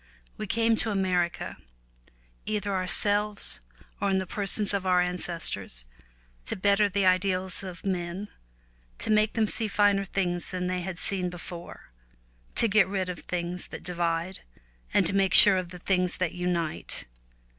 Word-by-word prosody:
We 215 - -6
came 225 +2 +2
to 225 - -1
America, 185 -4 -1 0.9
either 205 -1 -2
ourselves 205 - +2 0.4
or 200 - 0
in 190 - +2
the 190 - -1
persons 205 +2 +1
of 200 -2 -1
our 180 -1 +4
ancestors, 170 - 0 0.6
to - - -1
better 200 +2 +2
the 200 0 0
ideals 185 0 +1
of 185 -2 -9
men, 185 +1 -3 0.7
to - - -2
make 215 0 +3
them 225 -2 +2
see 220 +1 +1
finer 205 -1 +2
things 180 -2 -2
than 185 -1 -3
they 180 0 -2
had 180 0 -5
seen 185 -2 -2
before, 175 - -9 0.6
to 230 - +3
get 215 -2 +4
rid 190 -1 -2
of 180 - -5
things 175 0 -4
that - - -9
divide, 175 0 -2 0.5
and 195 - +3
to 180 - 0
make 195 -2 +2
sure 200 -2 +10
of 180 -2 -3
the 180 - -9
things 180 0 0
that 180 -2 -1
unite. 175 -3 -3
185 Hz, 155 wpm, -27 LUFS, 180-200 Hz, 0.9 s, sure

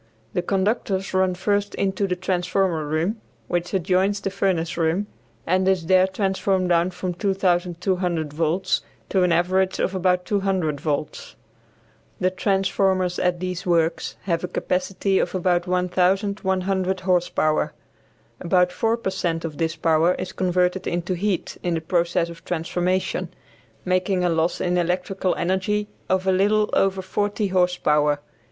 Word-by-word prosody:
The 180 - 0
conductors 195 0 -1
run 185 -1 +2
first 205 +2 0
into 195 0 0
the 180 - -1
transformer 180 -3 0
room, 170 +9 -1 0.3
which 175 0 -2
adjoins 190 +2 +1
the 195 -1 -3
furnace 180 -4 0
room, 170 +4 +1 0.4
and 185 +2 +2
is 190 -3 +2
there 185 +2 +5
transformed 190 -1 0
down 170 +1 +3
from 185 0 -4
2200 180 -3 0
volts 165 +4 0 0.3
to 190 - +2
an 180 -1 +3
average 185 +3 +2
of 190 - 0
about 180 -1 +1
200 190 -8 0
volts. 150 -1 -3 0.8
The 185 - +2
transformers 190 -1 +1
at 180 -1 +1
these 185 0 -4
works 165 -1 +1
have 170 -3 -1
a - - -1
capacity 185 +2 0
of - - -1
about 175 -1 +1
1100 190 +1 +1
horse 180 -1 +2
power. 155 0 +1 0.7
About 180 0 +2
4 225 +5 0
per 195 -5 -3
cent 165 -3 -2
of 155 -3 -6
this 165 -1 0
power 165 +2 +3
is 185 - -5
converted 180 0 0
into 175 +1 -1
heat 185 0 -2
in 175 -1 -1
the - - 0
process 170 +1 0
of 170 -1 -11
transformation, 180 +1 -1 0.6
making 185 0 +1
a - - +3
loss 165 +1 0
in 180 0 +1
electrical 180 +2 -1
energy 190 +4 0 0.2
of 185 0 +1
a 190 - +3
little 210 +3 +2
over 195 -1 +2
40 205 +2 -1
horse 180 -1 +2
power. 150 -2 +2
185 Hz, 145 wpm, -23 LUFS, 175-190 Hz, 0.8 s, there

